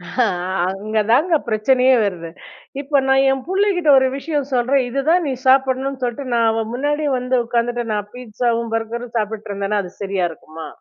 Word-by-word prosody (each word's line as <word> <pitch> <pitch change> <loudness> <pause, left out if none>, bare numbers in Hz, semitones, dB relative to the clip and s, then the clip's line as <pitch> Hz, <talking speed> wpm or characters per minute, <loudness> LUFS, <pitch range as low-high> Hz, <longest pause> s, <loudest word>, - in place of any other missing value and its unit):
ஹ - - -12 0.5
அங்க 215 +3 -4
தாங்க 320 +8 +3
பிரச்சனையே 250 +4 +3
வருது. 175 -4 -3 0.5
இப்ப 285 0 +1
நான் 270 0 +4
என் 270 - -1
புள்ளைகிட்ட 380 -3 +1
ஒரு 260 - +2
விஷயம் 290 -1 -3
சொல்றேன். 255 +2 +2
இதுதான் 310 +8 +1
நீ 270 - -1
சாப்பிடணுன்னு 265 0 +2
சொல்லிட்டு, 245 +3 -3
நான் 230 -1 +3
அவன் 225 0 -3
முன்னாடியே 290 +3 -1
வந்து 250 +1 0
உட்காந்துட்டு, 240 +1 -1
நான் 205 0 -3
பீஸாவும், 235 -1 -2
பர்கர் 230 +2 -4
சாப்பிட்டுருந்தேனா 210 -1 -2
அது 180 - -9
சரியா 195 -3 -1
இருக்குமா? 160 0 -10
245 Hz, 155 wpm, -19 LUFS, 215-270 Hz, 0.5 s, நான்